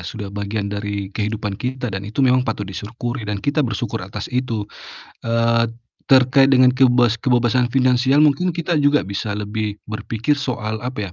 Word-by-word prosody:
sudah 100 +2 -7
bagian 100 0 -3
dari 100 -1 -4
kehidupan 105 0 -3
kita, 125 +2 -4
dan 95 - -3
itu 130 +6 +1
memang 130 0 +4
patut 105 -2 -2
disyukuri 110 +4 -5
dan 105 - -1
kita 145 +2 +1
bersyukur 120 -4 -2
atas 100 +3 -6
itu, 120 -4 -1 0.6
eee, 115 0 +1 0.4
terkait 135 +1 +5
dengan 130 -1 +5
keibas 125 -3 +3
kebebasan 125 -1 +2
finansial 130 +3 +3
mungkin 165 +4 +1
kita 170 +1 -2
juga 145 +1 +3
bisa 100 +1 -4
lebih 105 0 -3
berpikir 110 +5 -2
soal, 120 -6 -3
apa 105 -7 -5
115 Hz, 155 wpm, -20 LUFS, 105-130 Hz, 0.6 s, terkait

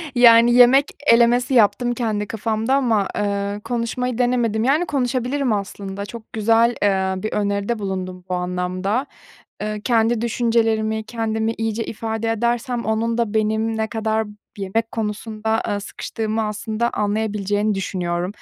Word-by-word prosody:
Yani, 235 -1 +7
yemek 250 +3 +6 0.2
elemesi 240 +2 +4
yaptım 240 +1 +3
kendi 220 -4 -2
kafamda 225 +3 -1
ama, 225 -7 +2
eee, 200 0 -1
konuşmayı 245 0 -2
denemedim. 240 -3 +1
Yani, 295 +8 +2
konuşabilirim 255 -1 0
aslında. 200 0 -4
Çok 225 +1 -11
güzel, 230 +2 +3
eee, 190 -1 +1
bir 215 - -2
öneride 205 +2 -1
bulundun 185 -2 -4
bu - - -1
anlamda. 180 +6 -1 0.6
Eee, 210 0 -3
kendi 230 -1 +2
düşüncelerimi, 225 -2 +1
kendimi 225 0 -2
iyice 225 0 -1
ifade 225 0 -3
edersem 235 +2 -1
onun 225 +1 0
da 230 -3 0
benim 220 +1 0
ne 220 0 0
kadar 220 0 -1 0.3
yemek 205 +4 -2
konusunda, 220 0 -2
ııı, 205 0 -1
sıkıştığımı 220 +2 -3
aslında 215 +2 -2
anlayabileceğini 210 0 -1
düşünüyorum. 180 -1 -2
S - - -24
220 Hz, 135 wpm, -21 LUFS, 205-235 Hz, 0.6 s, Yani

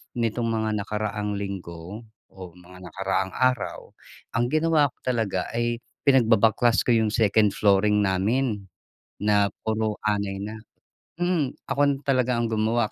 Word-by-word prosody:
nitong 115 0 -1
mga 110 -1 -1
nakaraang 105 0 -3
linggo, 95 +1 -7 0.3
o 95 -2 -9
mga 90 +1 -15
nakaraang 95 +1 -2
araw, 130 0 -1 0.4
ang 120 +1 +1
ginawa 155 -1 +3
ko - - -34
talaga 110 -7 -1
ay 120 0 0 0.2
pinagbabaklas 115 -3 +4
ko - - -3
yung 110 -2 +3
2nd 105 -2 +3
flooring 105 +1 +3
namin, 105 +3 0 0.5
na 105 -1 +2 0.2
puro 110 -1 -1
anay 100 -2 -1
na. 105 +2 -5 0.6
Mm, 170 -5 0
ako 140 -1 0
talaga 130 -2 +1
ang 115 -1 -1
gumawa 110 +1 +1
110 Hz, 130 wpm, -25 LUFS, 100-120 Hz, 0.6 s, pinagbabaklas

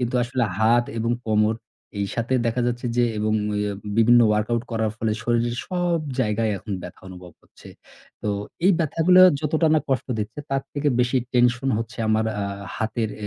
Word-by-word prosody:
কিন্তু 125 0 -2
আসলে 120 0 -1
হাত 120 +2 +4
এবং 115 +1 -1 0.2
কোমর 110 0 +2 0.5
এইসাথে 115 +5 -2
দেখা 120 +2 0
যাচ্ছে 120 0 -2
যে 120 - +4
এবং 110 0 0 0.3
এ - - 0 0.4
বিভিন্ন 120 +2 +6
workout 110 +2 0
করার 110 -2 0
ফলে 110 0 -1
শরীরের 120 0 0
সব 175 -2 0 0.2
জায়গায় 110 -1 0
এখন 105 - -7
ব্যথা 90 - -10
অনুভব 90 -1 -11
হচ্ছে। - - -17 0.5
তো 105 - -2 0.4
এই 190 - +6
ব্যথাগুলা 170 +3 +4 0.2
যতটা 155 +2 +1
না - - +5
কষ্ট 135 -2 0
দিচ্ছে 110 +7 -4
তার 135 0 0
থেকে 145 0 0
বেশি 125 +2 +1 0.2
tension 125 +2 +2
হচ্ছে 115 +2 -6
আমার 110 0 +2 0.2
আ - - -1 0.3
হাতের 110 -1 -2 0.2
এ - - -2
120 Hz, 170 wpm, -23 LUFS, 110-130 Hz, 0.5 s, বিভিন্ন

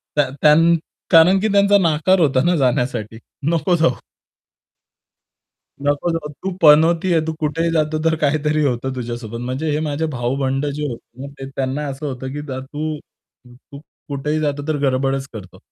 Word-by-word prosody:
त्या 145 -3 +2
त्या 150 -1 +7 0.6
कारण, 175 +4 +6
की 215 - 0
त्यांचा 200 0 +5
नकार 170 +3 +2
होता 135 -4 +3
ना 175 0 +3
जाण्यासाठी. 120 -5 -1 0.3
नको 175 +2 +1
जाऊ. 160 -7 +1 1.8
नको 145 +4 0
जाऊ. 160 -2 -3
तू 190 - -2
पनोती 165 +4 +5
आहे. 160 - +3
तू 160 - -2
कुठेही 165 +2 -1
जातो, 155 -1 0
तर 160 0 +3
काहीतरी 150 +1 +1
होतं 130 0 -1
तुझ्यासोबत. 120 -2 -5
म्हणजे 135 +5 -3
हे 150 - 0
माझे 150 +2 -2
भाऊ-बंध 135 +3 -1
जे 150 - -4
होते, 135 +4 -10
त्यांना 135 +2 -2
असं 140 +2 -6
होतं, 130 -1 -5
की 145 - -4
तू 145 +3 -5 0.5
तू 130 +3 -14 0.3
कुठेही 150 +2 -2
जातो, 145 0 -2
तर 155 -2 0
गडबडच 135 +1 -1
करतो. 100 -4 -10
145 Hz, 155 wpm, -19 LUFS, 130-160 Hz, 1.8 s, त्या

